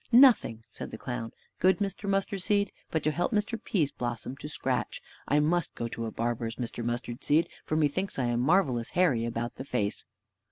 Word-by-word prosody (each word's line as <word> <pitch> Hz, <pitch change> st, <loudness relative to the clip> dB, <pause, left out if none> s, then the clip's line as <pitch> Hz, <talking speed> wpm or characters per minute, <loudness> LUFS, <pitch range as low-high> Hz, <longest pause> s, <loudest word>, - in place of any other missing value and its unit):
"Nothing," 235 Hz, -, +6 dB
said -, -, -7 dB
the -, -, -7 dB
clown, 115 Hz, -1 st, -4 dB, 0.3 s
"good 190 Hz, +1 st, +4 dB
Mr. 200 Hz, 0 st, -2 dB
Mustard 195 Hz, 0 st, 0 dB
seed, 205 Hz, 0 st, +2 dB, 0.2 s
but 160 Hz, -2 st, -1 dB
to 155 Hz, -, +2 dB
help 175 Hz, +8 st, 0 dB
Mr. 215 Hz, +1 st, -1 dB
Pease 155 Hz, -8 st, +1 dB
blossom 120 Hz, +1 st, -4 dB
to 150 Hz, -, -7 dB
scratch; -, -, -1 dB, 0.3 s
I 145 Hz, -, +4 dB
must 165 Hz, +3 st, +1 dB
go 115 Hz, -, -2 dB
to 115 Hz, 0 st, -4 dB
a -, -, -4 dB
barber's, 115 Hz, 0 st, -2 dB
Mr. 120 Hz, -1 st, -4 dB
Mustard 120 Hz, 0 st, -3 dB
seed, 155 Hz, +3 st, +3 dB, 0.2 s
for 155 Hz, -, -1 dB
methinks 160 Hz, +6 st, +1 dB
I 130 Hz, -, +1 dB
am 120 Hz, 0 st, +1 dB
marvelous 130 Hz, -5 st, +2 dB
hairy 140 Hz, -11 st, +3 dB
about 115 Hz, 0 st, -3 dB
the -, -, -4 dB
face." 110 Hz, -6 st, -2 dB
140 Hz, 195 wpm, -29 LUFS, 120-185 Hz, 0.3 s, Nothing